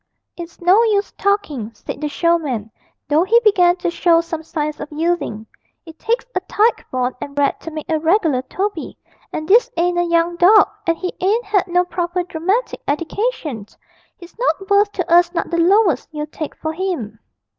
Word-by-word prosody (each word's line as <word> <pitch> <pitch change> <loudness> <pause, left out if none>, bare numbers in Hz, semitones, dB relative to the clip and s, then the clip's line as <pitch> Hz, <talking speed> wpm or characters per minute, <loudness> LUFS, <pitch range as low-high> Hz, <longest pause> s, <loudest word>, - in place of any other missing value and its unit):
'It's 340 -1 -9
no 365 +5 +5
use 410 -2 +1
talking,' 360 - -1
said - - -8
the 300 - -2
showman, 290 - 0 0.4
though 300 +3 +3
he 455 +5 +4
began 360 -5 +4
to 355 -1 -2
show 340 -1 +3
some 330 -1 -4
signs 305 -2 -4
of 295 - -7
yielding. 310 -9 -2 0.4
'It 325 -1 -13
takes 470 +2 -1
a - - 0
tyke 445 +3 +2
born 255 0 -1
and 280 - -7
bred 285 -1 +1
to - - -8
make 310 -1 -7
a 320 -2 0
reg'lar 320 -5 +2
Toby. 390 -3 -3 0.3
And 310 - -5
this 470 +6 +5
ain't 350 +1 +1
a - - +3
young 340 0 +1
dog, 405 +5 +6 0.2
and 335 0 +2
he 365 +1 -4
ain't 410 +3 0
'ad 390 -2 +3
no 355 0 +2
proper 355 0 -2
dramatic 365 +8 -2
eddication; 310 - -2 0.5
he's 345 -1 -14
not 400 -5 -1
worth 405 +1 +4
to 360 - -3
us 345 0 +5
not - - -2
the 340 - 0
lowest 360 - +3
you'd 300 -1 -6
take 310 - -5
for 315 0 -4
him.' 320 - -4
345 Hz, 185 wpm, -19 LUFS, 310-390 Hz, 0.5 s, dog